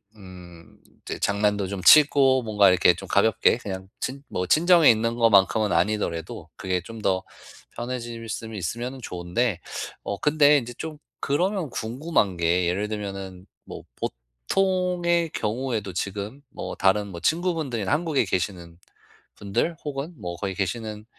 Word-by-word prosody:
음 90 -4 -14 0.2
이제 - - -6
장난도 100 0 +1
좀 95 -1 -5
치고 135 -3 +6
뭔가 105 -3 +4
이렇게 90 -1 +5
좀 - - -9
가볍게 110 +2 +3
그냥 95 -5 -7
친 135 +2 -4
뭐 90 - -2
친정에 170 - +6
있는 115 +1 0
것만큼은 110 -2 +4
아니더라도 85 -2 -1
그게 90 -1 -1
좀 115 +5 -10
더 95 -2 +1 0.5
편해질 120 -2 -5
수면 110 0 -5
있으면 120 +8 -4
좋은데 90 +2 -2 0.4
어 100 - -3
근데 150 -1 +5
인제 120 -1 -8
좀 155 -2 -6 0.2
그러면 180 +3 0
궁금한 115 - -1
게 85 +1 +2
예를 100 +4 -1
들면은 95 -3 -6 0.2
뭐 - - -9 0.6
보통의 180 -3 +1
경우에도 110 -4 -2
지금 100 +8 -4
뭐 - - -6
다른 100 +2 +2
뭐 90 -4 -8
친구분들이나 155 - -1
한국에 150 -4 +1
계시는 90 -2 -3 0.6
분들 105 +12 -2
혹은 145 +3 -4
뭐 85 -1 -4
거기 95 0 -3
계시는 105 +2 -4
110 Hz, 295 characters per minute, -25 LUFS, 95-135 Hz, 0.6 s, 치고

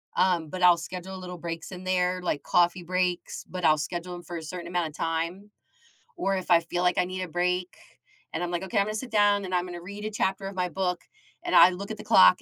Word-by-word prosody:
um, 175 -4 +2
but 185 +2 -5
I'll 175 -1 +7
schedule 185 +2 -7
a - - -7
little 180 -1 -8
breaks 165 +1 -6
in 185 0 -8
there, 180 0 +1
like, 150 -5 -2
coffee 175 0 +2
breaks, 180 0 -2
but 180 -2 -3
I'll 155 -1 +5
schedule 175 +2 -4
'em 175 - -7
for 170 +1 -6
a 160 - -7
certain 175 +2 -6
amount 175 -2 -1
of - - -15
time, 165 +5 -2 0.7
or 195 0 0
if 185 -1 -4
I 170 - +8
feel 175 +2 -3
like 180 0 +2
I 180 - +3
need 185 0 -4
a - - -4
break, 180 +1 -1 0.6
and 165 - -2
I'm 175 - -2
like, 175 - -1
"Okay, 205 +3 -3
I'm 200 - +4
gonna 215 - -3
sit 245 +3 -5
down, 205 -2 +3
and 185 - -2
I'm 180 0 +1
gonna 175 -1 -7
read 200 +3 -8
a 215 - -3
chapter 195 -2 -1
of 195 - -6
my 180 -1 0
book, 180 -1 -1 0.4
and 345 - 0
I 180 - +9
look 195 +2 -6
at 220 - -5
the - - -9
clock, 90 0 +6
180 Hz, 260 wpm, -27 LUFS, 175-190 Hz, 0.7 s, I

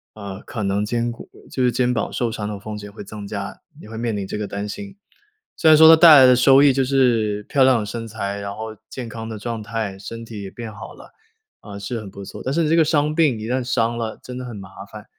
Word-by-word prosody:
呃， 100 -2 -8
可 115 -6 -6
能 100 +1 0
肩 120 +2 -1
骨 115 - -11 0.2
就 130 - -1
是 125 - +3
肩 125 0 +1
膀 115 - -2
受 120 -2 -1
伤 105 -2 -4
的 105 -1 -6
风 105 +1 -7
险 105 0 -9
会 105 - -9
增 100 0 -9
加， 100 -1 -6 0.2
也 - - -12
会 110 - -7
面 115 -3 -2
临 100 - -3
这 - - -5
个 105 -1 -3
担 100 +1 -5
心。 195 - -8 0.6
虽 160 - +3
然 155 - +8
说 160 +1 +9
它 165 - +10
带 160 -2 +9
来 130 - +8
的 125 0 +6
收 135 +2 +6
益 140 -2 +6
就 135 0 +1
是 120 -6 +1
漂 135 +5 +2
亮 130 -2 +5
的 105 - -3
身 115 +2 -6
材， 100 -2 -4
然 100 0 -5
后 110 0 -7
健 125 -3 -6
康 115 0 -7
的 110 - -6
状 115 +1 -4
态， 105 -3 -4
身 115 +3 -8
体 110 -3 -8
也 100 - -7
变 115 +1 -8
好 105 - -10
了， - - -15 0.5
啊， 100 -2 -10
是 100 +4 -4
很 105 -3 -9
不 100 +1 -10
错， - - -9
但 130 - -2
是 165 0 +1
这 160 - +3
个 165 - +5
伤 150 -1 +1
病 155 -8 +2
一 110 - -6
旦 125 +2 -1
伤 120 -2 0
了， 115 -2 -4
真 125 0 -8
的 - - -6
很 120 -3 -7
麻 95 -2 -9 0.2
烦。 105 -1 -10
115 Hz, 290 characters per minute, -21 LUFS, 105-130 Hz, 0.6 s, 它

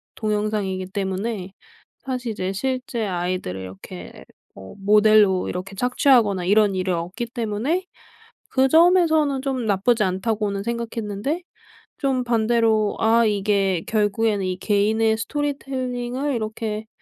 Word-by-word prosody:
동영상이기 210 -3 -2
때문에 195 +1 -3 0.5
사실 250 -3 -4
이제 185 -2 -3
실제 250 +1 -2
아이들을 180 - -3
이렇게 95 -1 -10 0.3
뭐 95 - -11
모델로 210 -1 +4
이렇게 185 +2 -5
착취하거나 235 -5 +3
이런 205 +1 +4
일이 185 0 -1
없기 180 +7 -3
때문에 240 - -2 0.6
그 265 0 +3
점에서는 320 -4 +4
좀 260 -3 -2
나쁘지 215 +3 +2
않다고는 200 +1 -1
생각했는데 235 - -3 0.6
좀 270 -3 0
반대로 225 -2 +2
'아. 230 +1 +4
이게 200 -3 +1
결국에는 210 -1 +1
이 185 0 -2
개인의 220 +2 +2
스토리텔링을 265 0 -3
이렇게 215 -1 -4
215 Hz, 295 characters per minute, -22 LUFS, 195-245 Hz, 0.6 s, 모델로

